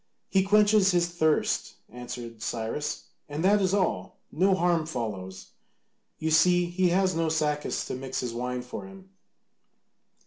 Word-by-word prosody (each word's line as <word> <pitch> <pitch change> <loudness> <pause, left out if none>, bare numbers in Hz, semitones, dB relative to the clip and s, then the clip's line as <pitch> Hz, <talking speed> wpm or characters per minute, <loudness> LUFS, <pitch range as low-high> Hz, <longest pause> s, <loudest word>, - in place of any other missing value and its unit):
"He 190 - +3
quenches 205 0 +4
his 175 -2 +3
thirst," 160 -3 0
answered 120 -1 -8
Cyrus, 120 +5 -3 0.3
"and 150 +4 -3
that 205 +1 +4
is 185 -1 +1
all. 195 -3 -1
No 190 +5 +3
harm 175 -3 +1
follows. 100 - -5 0.7
You 160 0 -2
see, 175 +2 +4
he 175 +1 +1
has 185 +1 +2
no 165 0 0
Sacas 150 -2 -1
to - - -5
mix 130 +1 -4
his 125 -2 -4
wine 125 +1 -3
for 125 +9 -8
him." 195 0 -14
160 Hz, 145 wpm, -27 LUFS, 125-185 Hz, 0.7 s, quenches